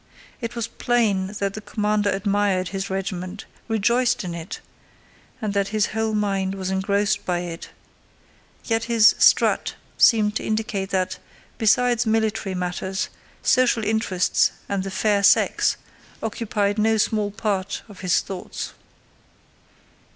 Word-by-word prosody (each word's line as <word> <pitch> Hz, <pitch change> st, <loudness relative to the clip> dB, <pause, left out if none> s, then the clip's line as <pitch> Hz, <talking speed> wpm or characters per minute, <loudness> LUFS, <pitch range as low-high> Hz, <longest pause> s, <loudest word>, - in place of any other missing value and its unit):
It 235 Hz, -1 st, -5 dB
was 235 Hz, -2 st, -2 dB
plain 215 Hz, -6 st, +1 dB
that 200 Hz, -1 st, -1 dB
the 215 Hz, -, -6 dB
commander 210 Hz, -1 st, 0 dB
admired 195 Hz, -2 st, 0 dB
his 195 Hz, 0 st, -4 dB
regiment, 190 Hz, +1 st, -4 dB, 0.2 s
rejoiced 235 Hz, +3 st, +1 dB
in 175 Hz, -2 st, -4 dB
it, 170 Hz, 0 st, -6 dB, 0.8 s
and 215 Hz, -4 st, -2 dB
that 200 Hz, -1 st, +1 dB
his 215 Hz, 0 st, +1 dB
whole 220 Hz, 0 st, 0 dB
mind 195 Hz, -2 st, 0 dB
was 190 Hz, -1 st, -3 dB
engrossed 200 Hz, +2 st, 0 dB
by 175 Hz, -1 st, -1 dB
it, 170 Hz, -1 st, -7 dB, 1.0 s
yet 225 Hz, -1 st, 0 dB
his 230 Hz, -2 st, +6 dB
strut -, -, +4 dB, 0.2 s
seemed 215 Hz, -3 st, +5 dB
to -, -, -6 dB
indicate 215 Hz, -3 st, -2 dB
that, 185 Hz, -1 st, -1 dB, 0.4 s
besides 240 Hz, +1 st, +3 dB
military 220 Hz, -3 st, 0 dB
matters, 185 Hz, +2 st, -3 dB, 0.3 s
social 250 Hz, -3 st, +3 dB
interests 205 Hz, -4 st, +2 dB, 0.2 s
and 200 Hz, -1 st, -1 dB
the 195 Hz, -, -4 dB
fair 200 Hz, +1 st, +1 dB
sex 200 Hz, 0 st, +4 dB, 0.5 s
occupied 215 Hz, -2 st, -1 dB
no 220 Hz, +1 st, +3 dB
small 210 Hz, -1 st, +1 dB
part 200 Hz, -2 st, -2 dB
of 205 Hz, -3 st, -13 dB
his 180 Hz, -2 st, +2 dB
thoughts. 190 Hz, -2 st, -6 dB
205 Hz, 130 wpm, -23 LUFS, 190-220 Hz, 1.0 s, his